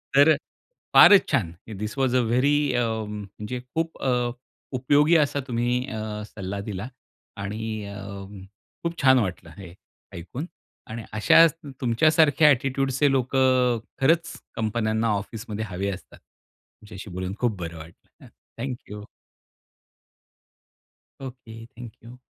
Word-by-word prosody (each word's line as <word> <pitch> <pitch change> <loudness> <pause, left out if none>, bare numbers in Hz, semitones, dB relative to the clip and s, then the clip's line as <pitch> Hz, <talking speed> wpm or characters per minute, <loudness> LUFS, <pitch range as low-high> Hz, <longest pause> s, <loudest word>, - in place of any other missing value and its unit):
तर 145 +3 +7
अ, - - -1 0.6
फारच 205 -2 +8
छान! 115 - +1 0.3
थिस 105 +5 -4
वॉज 130 -2 +1
अ 125 - +4
व्हेरी 140 +6 +2
अ, 120 -1 +2 0.2
म्हणजे 105 +4 -6
खूप 165 0 -2
अ, 125 -2 +1 0.4
उपयोगी 145 +6 +3
असा 145 -2 +1
तुम्ही 120 +1 0
अ, 110 -2 -5
सल्ला 100 -1 -6
दिला 100 +3 -5 0.5
आणि 110 +2 -4
अ, 100 0 -8 0.8
खूप 170 0 -3
छान 130 -1 +6
वाटलं 90 -5 -3
हे 90 -3 -10 0.4
ऐकून 90 - -6 0.4
आणि 115 +1 -6
अशाचं 155 +9 +6
तु 140 - -7
तुमच्यासारख्या 155 +4 +4
ॲटिट्यूडचे 135 +1 +1
लोकं 130 -1 +2
अ, - - -6 0.2
खरंच 165 +5 +2 0.2
कंपन्यांना 110 0 0
ऑफिसमध्ये 110 +1 -6
हवे 95 +1 -3
असतात, 95 - -10
तुमच्याशी 105 -1 -15
बोलून 90 +1 -4
खूप 115 -5 0
बरं 85 -1 -6
वाटलं. 80 +1 -15
अ, - - -15 0.3
thank 130 +1 -3
you. 105 0 -8 2.2
Okay, 120 -4 -9
thank 120 0 -11
you. 120 +2 -12
120 Hz, 130 wpm, -25 LUFS, 105-135 Hz, 2.2 s, फारच